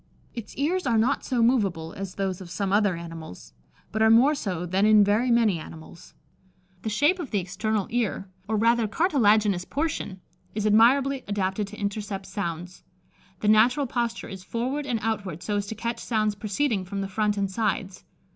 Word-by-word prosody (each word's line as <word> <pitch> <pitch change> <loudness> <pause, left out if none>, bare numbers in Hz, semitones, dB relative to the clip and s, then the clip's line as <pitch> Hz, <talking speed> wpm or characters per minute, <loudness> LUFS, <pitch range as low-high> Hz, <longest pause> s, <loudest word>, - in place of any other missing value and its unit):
Its 235 -4 -8
ears 320 +4 0
are 230 -2 +3
not 240 +6 +1
so 245 -3 +1
moveable 195 -10 +1
as 195 -2 -6
those 190 -2 -2
of 180 - -9
some 195 +2 -2
other 205 -3 +3
animals, 165 - -9 0.4
but 220 - -2
are 220 - +6
more 245 +7 +6
so 185 - -3
than 185 +3 0
in 215 -1 +6
very 210 +5 +2
many 225 -7 +3
animals. 160 +1 -12 0.7
The 220 - -3
shape 295 - +2
of 315 - -5
the 210 - -1
external 195 +3 -1
ear, 225 -4 -1 0.2
or 220 - 0
rather 230 +1 +3
cartilaginous 215 - +2
portion, 280 - -3 0.4
is 210 -1 -1
admirably 255 +6 +4
adapted 200 0 -1
to 210 +2 -11
intercept 205 -1 -4
sounds. 180 -2 -5 0.6
The 210 - -1
natural 235 +7 +4
posture 235 -2 -2
is 190 -1 -9
forward 260 +7 -3
and 245 -3 0
outward, 200 -7 -3
so 205 -1 -1
as 200 0 -2
to 220 - -5
catch 235 +2 -3
sounds 215 -2 0
proceeding 210 +1 -1
from 195 +2 -4
the 195 - -3
front 210 +1 0
and 195 -1 -1
sides. 195 -2 -2
210 Hz, 180 wpm, -26 LUFS, 195-235 Hz, 0.7 s, are